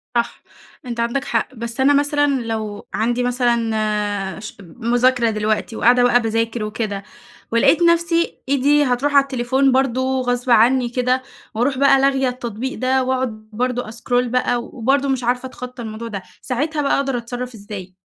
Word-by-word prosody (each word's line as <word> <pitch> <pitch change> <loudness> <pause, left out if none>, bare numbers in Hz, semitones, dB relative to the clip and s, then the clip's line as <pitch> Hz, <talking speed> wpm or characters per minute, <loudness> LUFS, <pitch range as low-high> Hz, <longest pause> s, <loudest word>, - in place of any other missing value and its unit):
صح. 235 0 -1 0.4
أنت 235 -1 -5
عندك 235 +4 0
حق، 235 +3 -1
بس 235 +1 -6
أنا 270 +2 +5
مثلًا 285 -1 +2
لو 220 -3 -5
عندي 240 +2 0
مثلًا 215 -5 0
ش 210 - -9
مذاكرة 240 +5 +1
دلوقتي 215 +1 -1
وقاعدة 245 +2 +4
بقى 245 0 +4
باذاكر 225 0 -1
وكده 210 -2 -3 0.5
ولقيت 230 +8 +4
نفسي 335 0 +2
إيدي 285 +2 +3
هتروح 270 +2 0
على 280 - +7
التليفون 265 0 +1
برضو 260 0 +1
غصب 245 0 -2
عنّي 240 +2 +4
كده 250 +1 0 0.3
وأروح 255 +5 0
بقى 275 0 +5
لاغية 270 -1 +2
التطبيق 245 0 -5
ده 260 +1 +2
وأقعد 255 -4 -2
برضو 245 +2 -1
أسكرول 245 +2 -1
بقى 245 -1 0
وبرضو 270 +4 0
مش 260 -2 0
عارفة 250 +2 0
أتخطى 250 -1 -9
الموضوع 220 +1 -6
ده، 200 -4 -5 0.2
ساعتها 295 +4 -2
بقى 280 - +2
أقدر 270 -2 -1
أتصرّف 245 +1 -5
إزاي؟ 200 -3 -9
245 Hz, 155 wpm, -20 LUFS, 230-265 Hz, 0.5 s, على